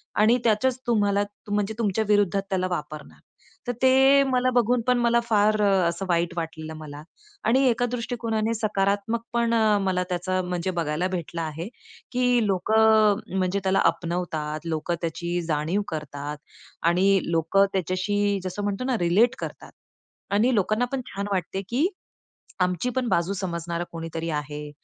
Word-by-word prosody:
आणि 220 +4 +4
त्याचच 245 +3 +2
तुम्हाला 205 -3 +2 0.3
म्हणजे 205 +1 0
तुमच्या 220 0 +1
विरुद्धात 205 -2 +2
त्याला 185 -1 0
वापरणार. 150 -1 -10 0.5
तर - - +1
ते 265 +2 +6
मला 255 -1 +1
बघून 240 0 +3
पण 250 - +4
मला 235 0 +3
फार 215 -1 +2
असं 190 -2 +2
वाईट 170 0 +1
वाटलेलं, 160 -1 -5
मला 150 -1 -9 0.4
आणि 260 +4 +4
एका 245 +1 +1
दृष्टिकोनाने 230 -2 -2
सकारात्मक 205 +1 0
पण 235 -1 +1 0.3
मला 185 -1 +1
त्याचा 185 +1 -1
म्हणजे 180 0 -2
बघायला 170 +1 -1
भेटलं 170 -2 -4
आहे. 160 +3 -4 0.4
की 245 -2 +2
लोकं 215 +2 +4
अ, 190 - -7
म्हणजे 185 +1 0
त्याला 190 0 +2
आपणवतात 165 -2 -4
लोकं, 165 +1 -2
त्याची 170 +1 -2
जाणीव 160 +6 0
करतात 150 -2 -5 0.5
आणि 190 +3 +3
लोकं 165 +5 +3
त्याच्याशी 195 +3 0
जसं 185 +2 -4
म्हणतो 205 +3 -2
ना, 255 -3 0
रिलेट 210 +9 +3
करतात - - -7 0.6
आणि 235 +5 +3
लोकांना 215 +4 +1
पण 270 -1 -2
छान 200 +1 -4
वाटते, 190 0 -2
की 275 +9 +2 0.8
आमची 180 +7 0
पण 255 -2 0
बाजू 185 -1 +1
समजणारा 170 -2 -3
कोणीतरी 165 0 -4
आहे. 150 0 -4
195 Hz, 145 wpm, -25 LUFS, 170-220 Hz, 0.8 s, ते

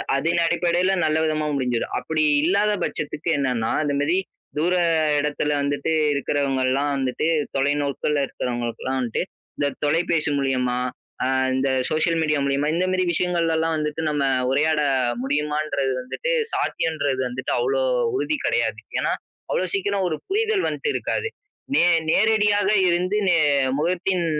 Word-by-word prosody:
அதின் 165 +5 +1
அடிப்படையில 175 +3 +1
நல்ல 155 0 +1
விதமா 155 -1 0
முடிஞ்சிரும். 125 -3 -1
அப்படி 160 -1 -1 0.2
இல்லாத 200 +5 +2
பட்சத்துக்கு 150 +2 -3
என்னன்னா, 125 -5 0
அந்த 145 -1 -1
மாரி 155 +5 +1 0.4
தூர 175 +4 +2 0.4
இடத்துல 150 0 -1
வந்துட்டு 145 +3 -1 0.2
இருக்கிறவங்கள்லாம் 140 -1 0
வந்துட்டு, 135 +3 -1 0.3
தொலைநோக்கல 145 +1 0
இருக்கிறவங்களுகலாம் 120 +2 -3
வந்துட்டு, 120 +2 -1 0.3
இந்த 145 - +1 0.2
தொலைபேசி 160 +1 +1
மூலியமா, 130 -2 0 0.5
அ - - +1 0.3
இந்த 130 +1 +1 0.2
சோஷியல் 165 +1 +1
மீடியா 150 -2 +1
மூலியமா 140 +2 0
இந்த 180 +2 +1
மாரி 185 0 +1
விஷயங்கள்லல்லாம் 165 -2 +1
வந்துட்டு 150 +1 -2
நம்ம 145 -2 0 0.3
உரையாட 150 +2 +2 0.4
முடியுமான்றது 150 -1 -1
வந்துட்டு, 315 - -3 0.2
சாத்தியம்றது 145 -5 -1
வந்துட்டு 130 +2 -3
அவ்ளோ 470 +2 +1 0.3
உறுதி 310 -6 -1
கிடையாது. - - 0 0.2
ஏன்னா, - - 0 0.4
அவ்வளோ - - 0
சீக்கிரம் 390 - 0
ஒரு 155 - -1
புரிதல் 425 0 +1
வந்ட்டு 460 - -3
இருக்காது. - - -1 0.5
நே - - +5 0.3
நேரடியாக 210 -1 +3 0.2
இருந்து 180 +3 +1
நே 175 -2 +4 0.4
முகத்தின் 180 +3 0
155 Hz, 130 wpm, -23 LUFS, 140-175 Hz, 0.5 s, நே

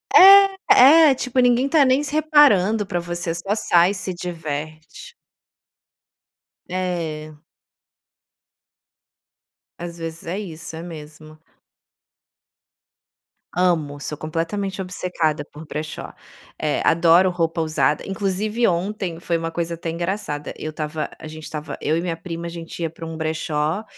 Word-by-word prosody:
É, 380 -6 +8
é, - - +1
tipo, 255 0 -2
ninguém 245 +2 +3
tá 290 -2 +5
nem 260 +3 +3
se 295 - -5
reparando 250 - +4
pra 175 -2 -2
você, 175 0 -4
só 195 +4 -2
sai 175 -4 +3
e - - -3
se 190 -1 -5
diverte. 160 - -7 1.5
É. 170 -4 -3 2.5
Às 170 0 -7
vezes 165 0 -7
é 180 +4 -3
isso, 165 -5 -7
é 160 - -6
mesmo. 155 -2 -11 2.2
Amo, 160 -6 +1
sou 150 - -5
completamente 165 +6 -3
obcecada 180 -5 -2
por 150 +2 -13
brechó, 155 0 -6 0.5
eh, 150 -1 -1
adoro 170 +3 +5
roupa 165 -1 -1
usada, 155 -1 0
inclusive 205 +4 -1
ontem 180 -1 -2
foi 170 -1 -1
uma 165 0 -3
coisa 170 0 -3
até 165 0 -5
engraçada, 170 -3 -4
eu 155 - -6
tava 155 0 -4
a - - -10
gente 155 0 -9
tava 150 0 -6
eu 155 +2 +1
e - - -1
minha 170 -1 -2
prima 170 0 -7
a 170 - -4
gente 170 0 -9
ia 165 - -2
para 165 0 -9
um 160 0 -7
brechó, 160 +3 -2
170 Hz, 135 wpm, -22 LUFS, 160-195 Hz, 2.5 s, É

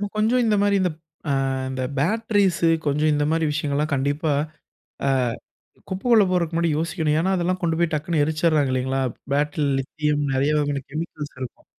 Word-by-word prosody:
கொஞ்சம் 225 +4 +2
இந்த 215 -2 +3
மாதிரி 205 0 +3
இந்த, 185 - +2 0.4
ஆ - - +2 0.4
இந்த 130 0 -3 0.2
பேட்டரீஸ் 205 +2 +1 0.2
கொஞ்சம் 150 +2 +2
இந்த 145 0 +1
மாதிரி 165 0 +1
விஷயங்கள் 145 -1 -1
எல்லாம் 150 +1 0
கண்டிப்பா, 145 +3 0 0.8
ஆ - - +3 0.8
குப்பைக்குள்ள 210 +3 +3
போறக்கு 170 -2 0
முன்னாடி 170 -1 +2
யோசிக்கணும். 160 -2 0
ஏன்னா 190 +4 +1
அதெல்லாம் 180 +1 -1
கொண்டுபோய் 170 -1 +1
டக்குன்னு 155 +1 0
எரிச்சுடுறாங்க 155 -3 +1
இல்லைங்களா? 130 +1 0 0.3
பேட்டரில 145 -1 +1
லித்தியம் 150 +2 -1
நெறைய 140 +3 +2
வகையான 145 -1 -1
கெமிக்கல்ஸ் 150 -2 -6
இருக்கும். 130 - -7
155 Hz, 155 wpm, -23 LUFS, 145-175 Hz, 0.8 s, இந்த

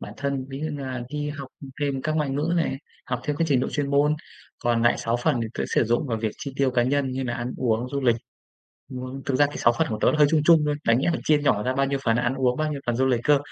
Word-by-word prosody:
bản 105 - -8
thân, 135 -1 -2
ví 135 +1 -6
dụ 155 - -2
như 145 -1 -5
là 130 -2 -4
đi 150 0 -3
học 140 -3 -7 0.3
thêm 140 -2 -1
các 155 0 -1
ngoại 150 -3 0
ngữ 150 +5 -1
này, 160 -5 0 0.3
học 125 -1 -2
thêm 145 -1 -1
cái 165 +2 +1
trình 130 -3 +3
độ - - -1
chuyên 140 -1 -2
môn, 145 +2 +3 0.4
còn 120 -1 +1
lại 120 - +3
sáu 115 +1 0
phần 120 0 +1
thì 115 - -3
tớ - - -2
sử - - +4
dụng 120 +6 0
vào 115 -3 -2
việc 110 -1 -1
chi 140 - -6
tiêu 135 -1 +2
cá 125 -1 +2
nhân 135 +1 +1
như 130 0 -2
nà 120 - -2
ăn 120 +1 -4
uống, 120 0 0
du 140 +1 -2
lịch. 120 -3 +3 0.7
Muốn 130 +1 -6
thực 135 - 0
ra 145 +2 +5
cái 145 - -8
6 120 - +4
phần - - +2
của 110 - -3
tớ - - +4
nó 155 - -1
hơi 150 - +7
chung 160 -2 +3
chung 165 -2 +7
thôi, 150 - +1
đáng 115 +1 +4
nhẽ 135 - +1
là - - -1
chia 150 -1 +4
nhỏ 110 -7 +2
ra 130 +3 -1
bao 135 0 +2
nhiêu 140 0 -1
phần 115 -1 +3
ăn 125 +2 0
uống, 130 -2 +1
bao 155 0 -1
nhiêu 140 - -5
phần 120 -1 0
du 130 +2 +2
lịch 125 -3 +2
cơ. 150 -2 +5
135 Hz, 310 wpm, -25 LUFS, 120-145 Hz, 0.7 s, hơi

